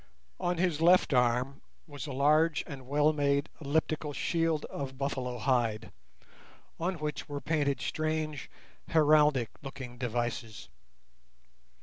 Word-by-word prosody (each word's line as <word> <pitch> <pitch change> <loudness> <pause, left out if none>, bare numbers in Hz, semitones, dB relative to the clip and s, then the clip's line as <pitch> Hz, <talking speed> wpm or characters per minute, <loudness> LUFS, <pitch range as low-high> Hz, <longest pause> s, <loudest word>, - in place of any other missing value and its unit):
On 175 0 0
his 170 -3 0
left 175 -2 +5
arm 125 +2 +1 0.2
was 145 -1 -8
a - - -5
large 150 +4 +3
and 130 -3 -9
well 150 +2 +3
made 140 0 +1
elliptical 150 +1 -1
shield 165 0 0
of 135 -2 -6
buffalo 130 -3 -2
hide, 115 -3 0 0.9
on 180 +3 -1
which 150 -3 -4
were 145 0 -3
painted 145 -3 0
strange 155 -2 -2 0.4
heraldic 150 -6 +4
looking 130 -3 -8
devices. 120 -3 -3
145 Hz, 115 wpm, -30 LUFS, 130-155 Hz, 0.9 s, left